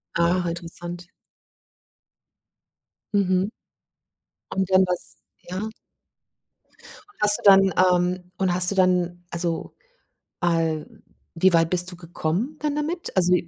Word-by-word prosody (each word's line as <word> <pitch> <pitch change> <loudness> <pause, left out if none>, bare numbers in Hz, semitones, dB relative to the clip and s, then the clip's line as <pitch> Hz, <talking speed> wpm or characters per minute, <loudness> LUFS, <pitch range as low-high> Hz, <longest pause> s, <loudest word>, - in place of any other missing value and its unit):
Ah, 175 +1 +2
interessant. 175 +1 -7 2.1
Mhm. 190 0 +2 1.0
Und 190 -1 -1
dann 190 0 +5
war's 180 -1 -4 0.3
ja. 185 +5 -4 1.5
Hast 210 0 +2
du - - -13
dann, 195 -2 +7
ähm 180 0 +2
und 185 -2 +1
hast 180 0 +2
du - - -2
dann, 180 -2 +2
also 170 -1 -3 0.6
al 165 -3 -1 0.3
wie 185 +2 +4
weit 165 0 +4
bist 180 0 +1
du - - -9
gekommen 175 - -3
dann 295 -1 -1
damit? 320 +4 -3
Also 180 -1 +4
180 Hz, 110 wpm, -24 LUFS, 175-190 Hz, 2.1 s, dann